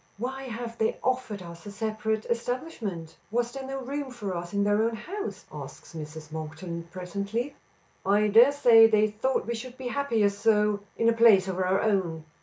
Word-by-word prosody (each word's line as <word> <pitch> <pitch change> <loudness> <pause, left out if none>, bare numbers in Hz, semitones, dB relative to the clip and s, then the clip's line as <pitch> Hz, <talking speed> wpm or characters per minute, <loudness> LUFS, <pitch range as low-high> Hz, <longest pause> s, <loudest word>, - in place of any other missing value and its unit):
"Why 265 +4 -4
have 235 -1 -6
they 220 - +1
offered 250 -7 -1
us 170 -1 -10
a - - -6
separate 220 +1 -2
establishment? 235 - -3
Was 240 +2 0
there 270 0 -6
no 270 0 -4
room 280 +1 -3
for 210 -7 -5
us 175 0 -5
in 200 0 +1
their 205 +1 +3
own 230 +1 +1
house?" 400 - -6
asks - - -9
Mrs. 155 -1 -8
Monkton 160 +2 -6
presently. 200 +9 -4 0.5
"I 205 +2 +3
dare 235 +6 +7
say 235 -6 +7
they 215 -1 +3
thought 255 +5 0
we 235 - -2
should 245 +2 -7
be 255 -2 -4
happier, 235 -6 +2
so 210 0 +2 0.2
in 230 - +2
a 230 - +5
place 225 -5 +6
of 190 -1 -3
our 185 +1 +2
own." 180 -7 0
220 Hz, 185 wpm, -27 LUFS, 190-240 Hz, 0.5 s, dare